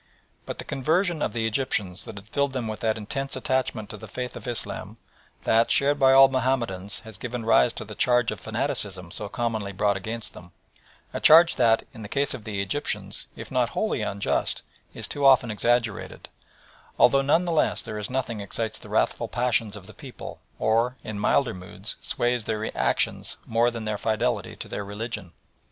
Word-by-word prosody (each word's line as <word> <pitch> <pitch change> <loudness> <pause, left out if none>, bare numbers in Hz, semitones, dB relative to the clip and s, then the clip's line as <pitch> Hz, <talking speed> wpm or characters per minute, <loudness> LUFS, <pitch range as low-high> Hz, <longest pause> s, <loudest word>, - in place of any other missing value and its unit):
But - - -5
the - - -5
conversion 160 +4 +1
of - - 0
the 115 -1 -1
Egyptians 105 -6 -1
has - - -8 0.2
filled 140 -1 +1
them 125 -4 -2
with 110 0 -4
that 110 -1 0
intense 135 +6 -3
attachment 130 -4 -1
to 105 - -7
the 110 - -10
faith 125 +4 -5
of - - -8
Islam 120 -2 -2 0.5
that, 115 +1 +3
shared 145 +1 +3
by 135 -1 +6
all 135 0 +9
Mahomedans, 120 -7 -1
has 110 -3 -9
given 120 -1 -4
rise 115 +1 +5
to - - -6
the 105 - -8
charge 125 0 +3
of - - -6
fanaticism 90 -4 -3
so 100 - -4
commonly 110 -3 -2
brought 100 +1 +1
against 110 +3 -5
them 85 -1 -13 0.6
a - - -2
charge 165 +2 +8
that, 115 -1 +4
in 115 - -10
the 105 - -7
case 140 +3 +1
of 105 - -8
the 100 -3 -2
Egyptians, 125 +10 -1
if - - -9
not - - +2
wholly - - 0
unjust, 100 0 -1 0.3
is - - -4
too 145 - -3
often 130 -4 +6
exaggerated, 115 0 0 0.7
although 135 - +6
none 150 +6 +3
the 175 - -1
less 160 - +2
there 105 - -5
is 105 - -4
nothing 125 -4 -2
excites 110 +2 -2
the - - -12
wrathful - - +1
passions 120 -3 0
of 100 -3 -10
the - - -12
people - - -9 0.2
or, 115 +3 +2
in 110 -2 -5
milder 120 +4 +2
moods, 90 0 -7
sways 120 -2 0
their 110 0 -3
actions - - +1
more 115 +1 +3
than 115 -2 -6
their 105 -1 -2
fidelity 115 +2 -1
to - - -7
their - - -4
religion. 105 -2 -5
115 Hz, 190 wpm, -26 LUFS, 105-130 Hz, 0.7 s, all